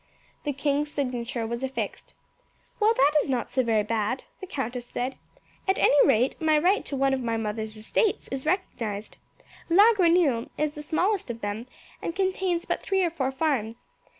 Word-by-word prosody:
The 295 - +1
king's 285 +1 0
signature 245 -4 -2
was 235 +3 -4
affixed. 265 0 -4 0.6
"Well, 440 +1 +4
that 285 -4 +4
is - - -5
not 250 -3 -1
so 260 - +2
very 225 -3 +2
bad," 220 +3 -1 0.2
the 380 - -7
countess 250 -5 -4
said. 250 +2 -3 0.5
"At 385 - +3
any 290 - +5
rate 255 +2 +2
my 310 -1 +4
right 365 +7 +3
to 280 - -4
one 270 0 +2
of 265 - -1
my 230 -2 -1
mother's 220 0 -4
estates 370 - 0
is 265 0 -4
recognized. 230 - -2 0.5
La 410 +7 +7
Grenouille 335 - +3
is 300 -1 0
the 300 - -7
smallest 360 - 0
of 230 -1 -5
them, 205 +4 -4 0.3
and 335 - -4
contains 375 -2 0
but - - -2
three 385 -1 +1
or 345 - +1
four 270 -5 -1
farms. 265 -6 -1
270 Hz, 180 wpm, -26 LUFS, 235-335 Hz, 0.6 s, La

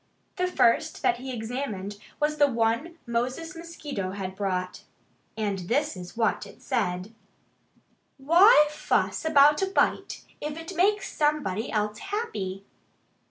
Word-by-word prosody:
The 365 0 +1
first 235 -9 +2
that 240 - +3
he 260 +2 -6
examined 220 -4 -4 0.2
was 300 0 0
the 290 - +5
one 235 +7 0
Moses 255 +9 -2
Mosquito 300 - -5
had 190 -1 -5
brought. 185 -2 -2 0.6
And 205 -3 -1
this 290 +1 +1
is 180 +4 -10
what 225 -2 0
it - - -15
said: 180 +4 -2 1.0
WHY 335 - +7
FUSS 300 - 0
ABOUT 295 0 +5
A 385 - +2
BITE, 385 - 0 0.2
IF 300 +1 -4
IT 325 0 -7
MAKES 405 +4 +2
SOMEBODY 295 -9 0
ELSE 210 0 -1
HAPPY? 200 - -4
255 Hz, 130 wpm, -27 LUFS, 205-310 Hz, 1.0 s, WHY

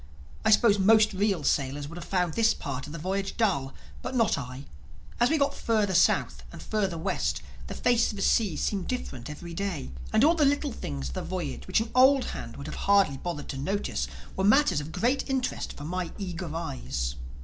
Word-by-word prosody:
I 220 - +3
suppose 210 -1 +5
most 215 +2 +5
real 195 -4 0
sailors 140 +1 0
would 165 +3 -8
have - - -9
found 180 -4 0
this 225 -1 +3
part 140 0 -5
of - - -9
the 165 - -6
voyage 195 +4 -3
dull. 175 - +1 0.3
But 260 - -5
not 230 -3 +3
I. 130 0 -7 0.5
As 240 - +4
we 320 - +3
got 280 -1 +2
further 215 -4 0
South 175 - +3
and - - -10
further 195 -5 -1
West 70 - -1 0.2
the - - -6
face 240 -1 +2
of - - -5
the 195 - -3
sea 205 -8 +2
seemed 195 -3 -1
different 130 - -4
every 170 +3 -8
day. 170 - -3 0.2
And 220 - +4
all 320 +3 +6
the 325 -3 +2
little 285 0 +2
things 70 - -5
of - - -6
a - - -1
voyage 65 0 -4
which - - +2
an 225 - -5
old 265 +1 +6
hand 115 - -7
would 140 - -7
have 155 - -6
hardly 195 -9 +4
bothered 165 -1 -5
to 135 - -4
notice 140 - -2 0.3
were 190 - -1
matters 215 - +4
of 150 +2 -8
great 255 - 0
interest 265 -2 -2
for 145 - -8
my 175 +2 -3
eager 180 -4 -5
eyes. 60 - -3
185 Hz, 210 wpm, -28 LUFS, 140-220 Hz, 0.5 s, all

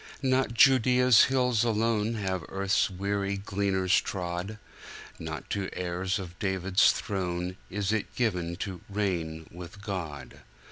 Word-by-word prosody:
Not 130 -3 +1
Judea's 125 -1 +6
hills 125 -4 +2
alone 115 -1 +1
Have 95 -5 -2
earth's 100 +2 +1
weary 100 +1 -2
gleaners 95 -2 +1
trod, 90 +3 -4 0.6
Not - - -6
to 100 -1 -2
heirs 90 +2 -2
of 90 -2 -8
David's 95 0 +3
throne 90 -2 -3
Is 100 0 -1
it 110 -2 -2
given 90 -8 -1
to 95 -4 -7
"reign 85 -6 -2
with 90 +3 -10
God." 80 - -6
100 Hz, 125 wpm, -28 LUFS, 90-110 Hz, 0.6 s, Judea's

